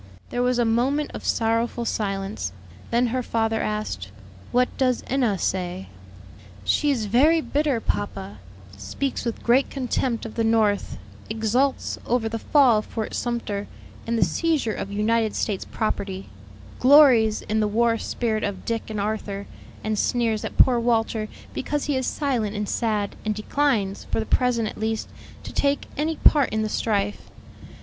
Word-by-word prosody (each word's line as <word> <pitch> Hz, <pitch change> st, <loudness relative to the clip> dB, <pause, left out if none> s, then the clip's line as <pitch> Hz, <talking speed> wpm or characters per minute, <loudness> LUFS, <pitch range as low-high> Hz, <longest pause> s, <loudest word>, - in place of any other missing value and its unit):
There 245 Hz, -, -1 dB
was 250 Hz, 0 st, +2 dB
a 240 Hz, -, +3 dB
moment 260 Hz, +6 st, +1 dB
of -, -, -7 dB
sorrowful 230 Hz, +1 st, 0 dB
silence. 195 Hz, -, -2 dB, 0.4 s
Then 240 Hz, +1 st, +2 dB
her 255 Hz, -, +1 dB
father 225 Hz, -2 st, 0 dB
asked, 210 Hz, -, -3 dB, 0.4 s
"What 250 Hz, +1 st, +3 dB
does 255 Hz, -2 st, +1 dB
Enna 245 Hz, -7 st, +1 dB
say?" 185 Hz, +1 st, -2 dB, 0.7 s
"She 295 Hz, -, +2 dB
is 245 Hz, -6 st, +1 dB
very 280 Hz, +10 st, +4 dB
bitter, 290 Hz, -4 st, 0 dB
papa: 105 Hz, -, -3 dB, 0.4 s
speaks 100 Hz, -, -3 dB
with 235 Hz, -, -3 dB
great 250 Hz, +3 st, +3 dB
contempt 250 Hz, -3 st, -1 dB
of 225 Hz, -, -6 dB
the 230 Hz, -, 0 dB
North; 220 Hz, -2 st, +1 dB, 0.3 s
exults 225 Hz, +5 st, 0 dB
over 235 Hz, -2 st, 0 dB
the 225 Hz, 0 st, -3 dB
fall 255 Hz, -4 st, +4 dB
of 215 Hz, -, -6 dB
Fort 220 Hz, -2 st, -4 dB
Sumter 225 Hz, -4 st, -2 dB, 0.4 s
and 230 Hz, 0 st, 0 dB
the -, -, +4 dB
seizure 310 Hz, -9 st, 0 dB
of 195 Hz, -, -5 dB
United 220 Hz, +1 st, +1 dB
States 200 Hz, -4 st, -1 dB
property; 195 Hz, -3 st, -3 dB, 0.5 s
glories 250 Hz, -6 st, +6 dB
in 215 Hz, +1 st, -1 dB
the 215 Hz, -, +2 dB
war 230 Hz, +2 st, +2 dB
spirit 220 Hz, -3 st, -1 dB
of 200 Hz, -2 st, -3 dB
Dick 230 Hz, -1 st, -2 dB
and 215 Hz, -1 st, -3 dB
Arthur, 200 Hz, -1 st, -3 dB, 0.4 s
and 215 Hz, -1 st, -1 dB
sneers 230 Hz, -3 st, +1 dB
at -, -, -6 dB
poor 250 Hz, -2 st, +5 dB
Walter 225 Hz, -2 st, +1 dB, 0.3 s
because 290 Hz, +2 st, -2 dB
he 290 Hz, -, 0 dB
is 260 Hz, -1 st, -1 dB
silent 240 Hz, -8 st, -1 dB
and 205 Hz, 0 st, -2 dB
sad, 210 Hz, -3 st, -1 dB
and 215 Hz, -1 st, -1 dB
declines, 215 Hz, -3 st, 0 dB
for -, -, 0 dB
the 220 Hz, -, -1 dB
present 245 Hz, -3 st, +1 dB
at -, -, -7 dB
least, 220 Hz, 0 st, -2 dB, 0.3 s
to -, -, -8 dB
take 280 Hz, 0 st, +1 dB
any 315 Hz, +3 st, -1 dB
part 290 Hz, -4 st, +4 dB
in 220 Hz, 0 st, -1 dB
the 215 Hz, -, -2 dB
strife. 205 Hz, -2 st, -1 dB
225 Hz, 160 wpm, -24 LUFS, 210-250 Hz, 0.7 s, glories